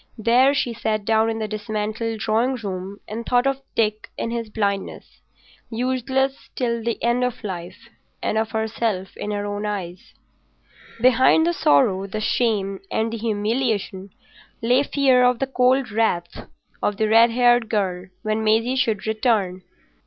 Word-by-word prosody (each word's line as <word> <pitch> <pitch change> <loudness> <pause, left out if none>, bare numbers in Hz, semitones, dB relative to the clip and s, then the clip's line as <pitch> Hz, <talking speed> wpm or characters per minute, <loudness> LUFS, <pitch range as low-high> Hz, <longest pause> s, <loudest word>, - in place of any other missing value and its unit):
There 245 +5 +4
she 245 -4 0
sat 215 -2 -2
down 220 +1 +3
in 225 - -2
the 220 -1 -3
dismantled 215 +1 -3
drawing 230 +4 +1
room 195 -3 -6
and 225 +2 -5
thought 245 +1 +2
of 275 0 0
Dick 215 -1 0
in 230 - -3
his 230 -2 -3
blindness, 200 -2 -3 0.5
useless 260 +3 -1
till 235 -2 -1
the 235 0 -1
end 240 +1 +2
of 250 0 -3
life, 175 -4 -7 0.3
and - - -2
of 220 0 0
herself 220 -3 -2
in 210 - -5
her 205 -1 -2
own 205 0 -4
eyes. 185 -3 -6 0.8
Behind 255 +6 +5
the 345 - +1
sorrow, 190 - +3
the 215 +2 -4
shame, 210 -4 0
and 225 +1 -1
the - - -2
humiliation, 215 -3 -1 0.5
lay 245 +3 +3
fear 270 -3 +3
of 250 -1 +4
the 270 - 0
cold 255 -1 +2
wrath 205 -6 -1 0.3
of 205 - 0
the 220 - +1
red 225 +2 +6
haired 240 -1 +3
girl 190 -4 -1 0.2
when 215 0 -1
Maisie 225 +4 +2
should 230 -6 0
return. 215 -5 0
225 Hz, 155 wpm, -22 LUFS, 210-245 Hz, 0.8 s, red